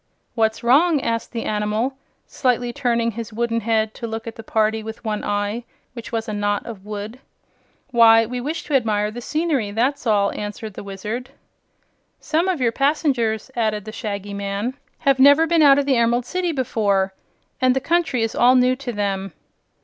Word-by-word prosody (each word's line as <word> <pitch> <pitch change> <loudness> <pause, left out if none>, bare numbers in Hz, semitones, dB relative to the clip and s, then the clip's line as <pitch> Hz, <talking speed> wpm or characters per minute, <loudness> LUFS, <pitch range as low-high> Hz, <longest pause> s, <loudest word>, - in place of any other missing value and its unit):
"What's 220 0 0
wrong?" 295 +6 +4
asked 230 -3 -2
the 230 -2 -4
animal, 215 +5 -1 0.3
slightly 245 -2 0
turning 235 -3 0
his 230 +1 -7
wooden 230 +1 -1
head 220 0 0
to 235 - -6
look 225 0 -5
at 230 - -7
the - - -8
party 220 0 0
with 220 +1 -9
one 210 -1 -2
eye, 205 +3 -2 0.3
which 235 -2 -9
was 225 0 -2
a 215 - -3
knot 205 0 -1
of 215 -5 -8
wood. 210 +3 -6 0.7
"Why, 225 -1 +6
we 245 +2 -4
wish 310 +5 -3
to 300 - -6
admire 210 -5 +1
the 240 +2 -7
scenery, 305 -6 -1
that's 245 +6 -1
all," 200 -2 +3
answered 210 +1 -6
the - - -8
Wizard. 210 +6 -5 0.9
"Some 330 +4 0
of 370 -5 0
your 240 -3 +2
passengers," 265 -5 0
added 215 -3 -1
the 215 - -6
Shaggy 205 -2 -5
Man, 200 +4 -3 0.2
"have 275 -1 +2
never 285 +4 +7
been 330 0 +2
out 280 -2 +7
of 285 - +1
the 270 -3 +2
Emerald 235 +1 +2
City 360 +4 -1
before, 205 -8 0 0.5
and 255 0 +4
the - - +2
country 320 -4 +1
is 225 - -1
all 250 +1 +5
new 255 0 +4
to 265 -2 -5
them." 195 -3 -2
230 Hz, 185 wpm, -21 LUFS, 215-260 Hz, 0.9 s, never